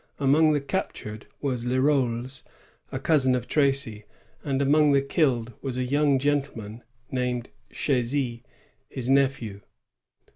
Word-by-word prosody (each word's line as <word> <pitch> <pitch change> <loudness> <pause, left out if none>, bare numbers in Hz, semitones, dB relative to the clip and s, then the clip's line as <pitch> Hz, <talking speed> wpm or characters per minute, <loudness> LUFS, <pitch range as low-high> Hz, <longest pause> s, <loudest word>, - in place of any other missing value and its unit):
Among 150 +3 +4
the 145 - +1
captured 110 -5 -4
was 130 -4 -1
Leroles, 130 -1 0 0.5
a - - -3
cousin 135 -5 +3
of 125 -1 -3
Tracy; 135 -7 +1 0.4
and 135 -2 -1
among 145 +1 +4
the 140 - +4
killed 125 -6 +1
was 130 -2 -4
a 130 - 0
yotmg 140 +1 +3
gentleman 135 -6 -2 0.3
named 125 -1 -2 0.2
Chasy, 125 -2 0 0.5
his 130 -1 -2
nephew. 130 -7 +1
130 Hz, 120 wpm, -26 LUFS, 120-140 Hz, 0.5 s, Among